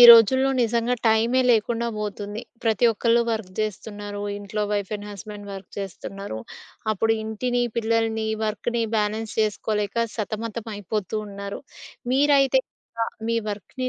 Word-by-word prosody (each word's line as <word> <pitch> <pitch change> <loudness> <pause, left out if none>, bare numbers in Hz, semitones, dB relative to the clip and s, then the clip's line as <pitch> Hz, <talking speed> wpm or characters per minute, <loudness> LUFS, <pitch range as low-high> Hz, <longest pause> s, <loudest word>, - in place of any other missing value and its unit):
ఈ - - +10
రోజుల్లో 260 +4 +8
నిజంగా 235 +1 +2
టైమే 225 +3 +4
లేకుండా 235 +1 +2
పోతుంది. 205 0 -4 0.2
ప్రతి 220 0 +3
ఒక్కళ్ళు 230 +2 +3
వర్క్ 220 -5 -3
చేస్తున్నారు, 205 -1 -4 0.2
ఇంట్లో 205 +1 -3
వైఫ్ 200 -2 -1
అండ్ 205 0 -9
హస్బెండ్ 205 +1 -8
వర్క్ 195 -1 -8
చేస్తున్నారు. 195 - -5 0.5
అప్పుడు 225 +2 +2
ఇంటిని, 245 +3 0 0.2
పిల్లల్ని, 225 -1 +1 0.2
వర్క్‌ని 230 +2 -1
బ్యాలెన్స్ 215 +1 -1
చేసుకోలేక 210 -1 0 0.2
సతమతం 220 +1 -3
అయిపోతు 205 +1 -2
ఉన్నారు. 200 0 -6 0.5
మీరైతే 275 -1 +5 0.3
ఎలా 230 0 0 0.2
మీ 230 - +2
వర్క్‌ని, 230 +5 -4
220 Hz, 125 wpm, -25 LUFS, 205-230 Hz, 0.5 s, ఈ